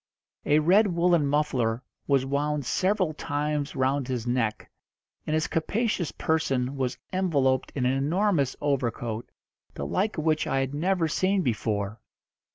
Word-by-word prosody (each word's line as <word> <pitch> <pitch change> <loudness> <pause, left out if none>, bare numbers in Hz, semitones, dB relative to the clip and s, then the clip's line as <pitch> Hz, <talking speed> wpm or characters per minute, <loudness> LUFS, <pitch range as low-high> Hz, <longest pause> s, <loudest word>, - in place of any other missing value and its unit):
A 150 - +5
red 185 +8 +5
woollen 170 -4 +2
muffler 130 -5 0 0.2
was 135 -2 +3
wound 145 +1 -1
several 185 - +1
times 150 -1 -2
round 135 0 +1
his 125 -3 -3
neck, 120 -3 -1 0.6
and 155 - +1
his 155 0 +1
capacious 200 +1 -1
person 135 -5 0
was 130 -2 -2 0.2
enveloped 140 -9 +1
in 130 -3 0
an 125 - +3
enormous 150 +1 +1
overcoat, 120 -5 -2 0.5
the 70 - -4
like 195 - -1
of 155 - -1
which 155 -1 +1
I 135 - +1
had 135 +1 -2
never 170 +2 +1
seen 185 +4 +1
before. 105 -3 -2
145 Hz, 145 wpm, -27 LUFS, 130-165 Hz, 0.6 s, A